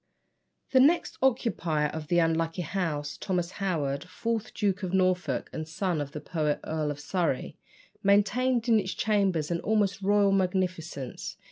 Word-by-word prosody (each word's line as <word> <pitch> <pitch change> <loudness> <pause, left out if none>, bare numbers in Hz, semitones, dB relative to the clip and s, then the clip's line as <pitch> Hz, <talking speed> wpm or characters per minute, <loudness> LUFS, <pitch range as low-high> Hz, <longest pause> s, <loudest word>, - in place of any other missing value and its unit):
The 260 - +5
next 305 +7 +3
occupier 180 - +1
of 155 0 -6
the 175 - +2
unlucky 165 +1 +1
house, 150 -5 -2
Thomas 180 -2 -2
Howard, 145 -7 -1
fourth 225 +3 -2
Duke 200 -2 0
of 185 -1 -2
Norfolk, 185 -8 +1
and 155 0 -4
son 165 -1 -1
of 140 -1 -5
the 150 - -5
poet 150 -1 -1
Earl 155 -1 -2
of 145 -1 -4
Surrey, 165 -2 -2 0.4
maintained 230 +5 +2
in 225 -2 +5
its 190 -2 -3
chambers 195 -7 +1
an 170 - 0
almost 205 -1 +1
royal 200 0 +3
magnificence. 180 -7 -2
180 Hz, 150 wpm, -28 LUFS, 155-200 Hz, 0.4 s, The